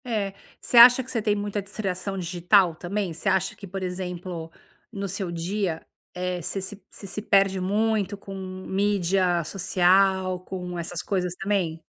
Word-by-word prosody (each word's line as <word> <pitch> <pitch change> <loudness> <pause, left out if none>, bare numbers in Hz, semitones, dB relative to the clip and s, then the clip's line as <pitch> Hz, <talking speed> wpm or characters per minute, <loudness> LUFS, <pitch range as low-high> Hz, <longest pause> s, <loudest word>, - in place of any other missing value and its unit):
Eh, 210 -5 -2 0.3
você 245 - 0
acha 245 +2 +10
que 255 - -8
você 230 - -1
tem 210 -1 +1
muita 205 0 -2
distração 195 -1 -4
digital 180 0 +3
também? 185 +1 -3
Você 170 +5 -2
acha 190 0 +1
que, 200 - -10
por 190 +1 -5
exemplo, 180 -2 -5 0.4
no 200 -3 -4
seu 190 -1 -4
dia, 170 0 -2 0.3
eh, 180 0 -2
você 195 - -3
se 200 +2 -7
você - - -12
se 195 +2 -5
perde 195 -2 +3
muito 205 +1 0
com 195 0 -10
mídia 190 -1 0
social, 185 +1 +2
com 180 -1 -6
essas 170 +1 -4
coisas 180 -3 -1
também? 180 -5 -1
190 Hz, 160 wpm, -25 LUFS, 180-200 Hz, 0.4 s, acha